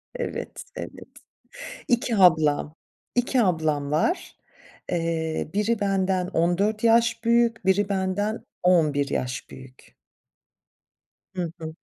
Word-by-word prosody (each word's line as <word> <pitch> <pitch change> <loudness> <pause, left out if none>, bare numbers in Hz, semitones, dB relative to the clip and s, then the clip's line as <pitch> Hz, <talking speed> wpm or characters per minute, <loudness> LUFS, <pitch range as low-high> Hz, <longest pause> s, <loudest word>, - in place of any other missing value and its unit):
Evet, 485 - -5
evet. - - -8 0.8
2 240 -1 +1
ablam, 155 -5 +4 0.4
2 245 +1 +2
ablam 155 -7 0
var. 165 - 0 0.6
Eee, 165 -2 -1
biri 210 +2 +1
benden 190 -2 0
14 195 +5 0
yaş 230 0 +3
büyük, 230 -2 +2
biri 195 +1 +2
benden 200 +3 -1 0.2
11 155 -6 +3
yaş 125 -2 -3
büyük. 130 -1 -14 1.4
Hı 175 -3 -2
hı. 160 -1 -6
185 Hz, 100 wpm, -25 LUFS, 160-220 Hz, 1.4 s, ablam